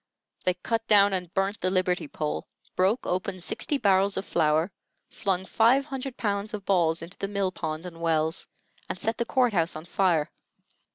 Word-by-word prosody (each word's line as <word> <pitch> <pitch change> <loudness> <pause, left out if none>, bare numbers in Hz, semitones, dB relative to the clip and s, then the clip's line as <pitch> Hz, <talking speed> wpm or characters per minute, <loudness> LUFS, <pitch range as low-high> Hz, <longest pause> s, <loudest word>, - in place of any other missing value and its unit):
They 180 - +3
cut 225 +5 -2
down 200 -2 +6
and 180 -2 -3
burnt 195 +2 0
the 185 - +2
liberty 185 -3 0
pole, 150 +1 -3 0.3
broke 195 +7 +2
open 185 +1 -2
sixty 280 - -1
barrels 200 -4 +3
of 195 - -2
flour, 160 +3 +2 0.4
flung 190 -2 -1
five 240 +7 +4
hundred 270 -2 -5
pounds 205 0 -1
of 200 -2 -8
balls 170 -4 +2
into 170 +3 -11
the 195 - -2
mill 200 -2 -1
pond 155 -1 -4
and 165 -2 -9
wells, 160 0 0 0.4
and - - -3
set 225 0 -1
the 235 - +1
court 250 -2 +2
house 170 -2 +1
on 155 +1 -7
fire. 175 -4 +1
190 Hz, 180 wpm, -27 LUFS, 170-205 Hz, 0.4 s, down